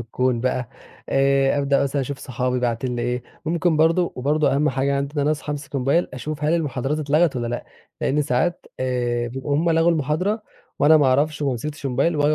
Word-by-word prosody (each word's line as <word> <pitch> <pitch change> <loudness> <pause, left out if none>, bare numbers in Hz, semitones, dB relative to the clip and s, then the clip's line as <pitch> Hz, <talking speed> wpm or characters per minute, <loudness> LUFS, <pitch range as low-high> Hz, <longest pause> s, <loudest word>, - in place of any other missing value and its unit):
الكون 120 +1 -1
بقى. 125 -1 -1 0.4
آآ، 135 +1 +3
أبدأ 140 0 +2
مثلًا 140 +1 0
أشوف 135 +1 -5
صحابي 125 0 -2
باعتين 120 +1 -1
لي 120 - -2
إيه، 125 +1 -2 0.2
ممكن 170 0 +1
برضه 165 +3 +3
وبرضه 140 +1 +1
أهم 150 +2 +2
حاجة 140 +1 0
عندي 140 +2 -3
إن 145 - +2
أنا 145 - +2
أصحى 150 -1 -2
أمسك 145 -1 -6
الMobile 140 +7 +2
أشوف 150 +4 -5
هل 155 +3 +3
المحاضرات 145 -2 -1
اتلغت 150 +1 +2
والّا 120 -1 -2
لأ، 120 +1 -4 0.4
لأن 150 +2 +1
ساعات، 145 +7 -1
آآ، 120 -2 -1
بيبقوا 135 +3 -3
هُم 165 +2 +2
لغوا 165 +1 +4
المحاضرة، 165 - 0 0.4
وأنا 155 +2 +6
ما 145 -3 +4
أعرفش 145 +3 +1
وما 140 - +1
مسكتش 145 +4 -5
الMobile 135 +6 +1
وآجي 150 0 +2
140 Hz, 200 wpm, -22 LUFS, 130-155 Hz, 0.4 s, وأنا